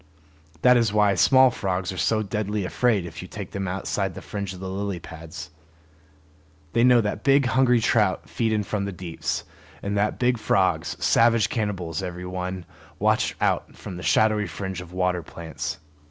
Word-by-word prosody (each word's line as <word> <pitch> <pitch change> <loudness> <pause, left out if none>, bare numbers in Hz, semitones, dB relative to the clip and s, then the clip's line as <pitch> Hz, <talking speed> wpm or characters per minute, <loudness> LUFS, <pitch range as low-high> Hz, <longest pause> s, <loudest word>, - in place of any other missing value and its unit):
That 125 -1 +7
is 115 -3 +2
why 105 -1 +4
small 130 +7 +5
frogs 95 -4 -2
are 95 - -7
so 110 +4 +1
deadly 105 0 -2
afraid 105 -1 +1
if 80 - -8
you - - -8
take - - -7
them 95 -1 -3
outside 95 0 -2
the - - -7
fringe 100 -2 -4
of 95 - -9
lily 95 0 -3
pads. 80 -1 -9 1.2
They 115 - +3
know 125 -1 +6
that 105 -1 -3
big 140 0 +4
hungry 125 -1 +3
trout 110 -4 +1
feed 115 -2 -1
in 105 -1 +1
from 100 0 -2
the 100 - -3
deeps, 90 -3 -4 0.4
and 100 +1 -2
that 105 +1 +1
big 125 -1 +1
frogs, 95 -3 +1
savage 115 -1 +4
cannibals 95 -8 -2
every 90 -1 -5
one, 90 0 -4 0.3
watch - - +1
out - - 0
from 95 - -8
the - - -7
shadowy 105 +5 +3
fringe 95 +2 -5
of 90 -1 -11
water 90 -1 0
plants. 80 -1 -6
100 Hz, 175 wpm, -24 LUFS, 90-110 Hz, 1.2 s, That